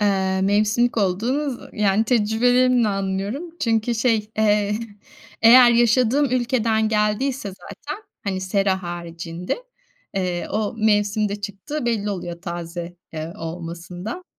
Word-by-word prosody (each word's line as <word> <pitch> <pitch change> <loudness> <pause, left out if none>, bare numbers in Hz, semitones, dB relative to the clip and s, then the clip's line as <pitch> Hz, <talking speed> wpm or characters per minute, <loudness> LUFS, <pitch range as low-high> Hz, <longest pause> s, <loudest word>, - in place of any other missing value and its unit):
Eee, 190 -2 +1
mevsimlik 210 +5 +2
olduğu 230 +9 0
zı 245 - -9
yani, 210 +1 +2
tecrübelerimle 245 +1 +3
anlıyorum 195 - -2 0.2
çünkü 225 0 +1
şey, 220 -2 +1
eee, 210 -1 +2 0.6
eğer 240 +1 +9
yaşadığım 240 +4 +3
ülkeden 235 -3 +1
geldiyse 210 +3 0
zaten, 295 - -9 0.2
hani, 190 -2 -2
sera 190 0 0
haricinde, 175 - -5 0.5
eee, 180 -2 -2
o 215 +2 -1
mevsimde 210 -1 +2
çıktığı 210 +8 -5
belli 210 -3 0
oluyor 175 -2 -5
taze, 175 0 -6 0.2
eee, 160 +1 -5
olmasında. 175 - -6
210 Hz, 115 wpm, -22 LUFS, 190-235 Hz, 0.6 s, eğer